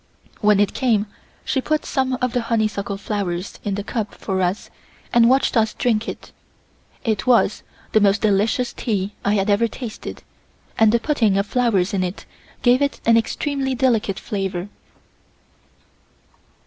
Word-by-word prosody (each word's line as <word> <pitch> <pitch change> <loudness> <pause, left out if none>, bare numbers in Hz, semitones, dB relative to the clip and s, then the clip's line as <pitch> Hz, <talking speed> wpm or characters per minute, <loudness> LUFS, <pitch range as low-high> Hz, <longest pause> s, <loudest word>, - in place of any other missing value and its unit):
When 210 -2 +4
it 205 - +2
came, 225 -6 +1 0.4
she 265 - 0
put 305 +3 -1
some 260 -1 0
of 250 - 0
the 245 - +1
honeysuckle 215 -3 -1
flowers 195 -3 -4
in 200 -2 -1
the 205 - -3
cup 215 -1 -4
for 190 -1 -2
us 180 +3 -2 0.4
and 235 0 +6
watched 265 +1 +2
us 220 -2 +2
drink 230 -2 0
it. - - -9 0.7
It 220 0 -1
was 235 -4 +3 0.3
the 215 - +4
most 200 +1 +3
delicious 215 +4 +1
tea 205 -3 -2
I 205 +1 +2
had 195 0 +1
ever 210 +3 +3
tasted 230 -1 -8 0.5
and 220 -1 +5
the 235 - +3
putting 230 -8 +1
of 200 - +1
flowers 210 -6 +1
in 190 -2 +1
it 180 +3 -5 0.4
gave 245 +2 +4
it 280 0 0
an 230 - +5
extremely 265 +3 0
delicate 230 -6 +1
flavour. 195 -3 -3
215 Hz, 155 wpm, -21 LUFS, 200-245 Hz, 0.7 s, and